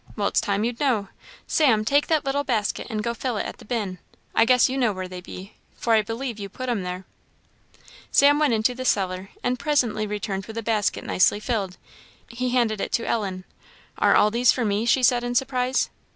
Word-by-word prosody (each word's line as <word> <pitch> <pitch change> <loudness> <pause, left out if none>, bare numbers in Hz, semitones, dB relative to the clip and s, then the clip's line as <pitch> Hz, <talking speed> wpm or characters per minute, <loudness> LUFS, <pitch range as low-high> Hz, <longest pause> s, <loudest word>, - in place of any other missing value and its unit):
Well, 205 -2 0
it's - - +1
time 200 +1 -1
you'd 235 0 -2
know. 230 -9 +1 0.4
Sam, 230 -9 +3
take 285 +5 +2
that 315 -3 +1
little 280 +1 0
basket 220 -7 -1
and 215 -2 -3
go 235 - -1
fill 240 -1 -3
it - - -2
at - - -7
the - - -13
bin; 205 -6 -3 0.3
I 225 - +4
guess 250 +1 +5
you 260 - -3
know 245 -5 +2
where 185 -1 -5
they 180 0 -8
be, 190 +2 -10 0.2
for 230 - 0
I 220 - +5
believe 225 +2 -5
you 200 -1 -6
put 255 +6 -6
'em 230 -5 0
there." 180 +1 -5 1.1
Sam 285 +1 +5
went 290 -6 +3
into 220 +3 +1
the 255 +1 -6
cellar, 190 -5 0
and 245 0 0
presently 235 -8 0
returned 200 -1 -4
with 220 - -8
the 230 - -4
basket 215 -2 0
nicely 190 +2 +2
filled. 210 -5 -3 0.5
He 250 +1 -3
handed 235 -4 +1
it - - -3
to 230 - 0
Ellen. 190 -5 -2 0.6
"Are - - +4
all 210 - +4
these 240 +2 +4
for 250 - -1
me?" 210 +2 0
she 255 +2 +3
said 245 -1 +4
in 245 0 -3
surprise. 255 0 0
225 Hz, 215 wpm, -24 LUFS, 205-250 Hz, 1.1 s, guess